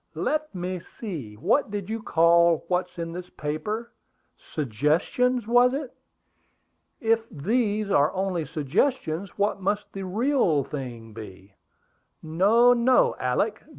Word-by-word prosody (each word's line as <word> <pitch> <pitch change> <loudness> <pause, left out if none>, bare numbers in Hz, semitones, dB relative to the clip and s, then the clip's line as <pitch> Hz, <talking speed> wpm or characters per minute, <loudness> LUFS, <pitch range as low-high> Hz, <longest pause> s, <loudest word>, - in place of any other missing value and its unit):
"Let 305 -6 -2
me 180 0 -3
see, 165 - -8
what 205 - +1
did 200 -2 -4
you 225 +1 -4
call 170 -3 +4
what's 180 0 -1
in 165 -1 -4
this 180 +1 -7
paper? 155 +10 -4 0.4
Suggestions, 155 - 0
was 245 +3 +4
it? 280 -3 -5 1.1
If 225 0 +1
these 210 - -1
are 145 -2 +4
only 185 -4 -1
suggestions, 165 - -1
what 200 0 0
must 205 +1 -2
the 195 - -5
real 205 - +1
thing 120 -6 -7
be! 100 -3 -11 0.7
No, 205 +10 +4
no, 245 +1 +3
Alick! 130 - 0
185 Hz, 120 wpm, -25 LUFS, 155-225 Hz, 1.1 s, call